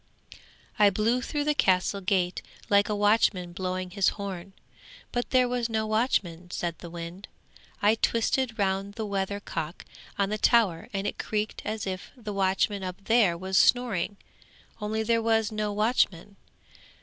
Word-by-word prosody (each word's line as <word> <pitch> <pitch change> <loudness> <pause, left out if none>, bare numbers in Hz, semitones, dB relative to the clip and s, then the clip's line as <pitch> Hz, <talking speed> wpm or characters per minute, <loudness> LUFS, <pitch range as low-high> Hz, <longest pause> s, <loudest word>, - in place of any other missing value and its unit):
'I 205 -1 +7
blew 220 +5 +1
through 290 +4 -2
the 300 0 +2
castle 190 -5 +2
gate 185 -1 0 0.3
like 200 +1 +4
a 210 - 0
watchman 205 -4 +2
blowing 185 0 -3
his 195 0 +3
horn, 195 -2 -6 0.6
but 245 0 -2
there 255 -1 +4
was 245 -1 -1
no 220 -1 0
watchman,' 205 -6 0
said 175 -1 -3
the 170 - -8
wind. 170 +3 -8 0.6
'I 210 +1 +6
twisted 230 +1 +1
round 195 0 -1
the 220 -2 -3
weather 200 0 -2
cock 165 -4 -5 0.3
on 200 -1 +1
the 215 0 -2
tower 210 -8 +3
and 195 0 -3
it - - -3
creaked 215 0 -2
as 215 0 -3
if 185 -1 -5
the 215 -4 -6
watchman 195 +1 +1
up 185 -1 -4
there 210 -6 +3
was 190 +3 +1
snoring, 220 -5 +2 0.6
only 215 +1 -1
there 230 +1 +2
was 225 -1 +2
no 215 -1 -2
watchman. 205 -3 +1
205 Hz, 160 wpm, -27 LUFS, 185-220 Hz, 0.6 s, I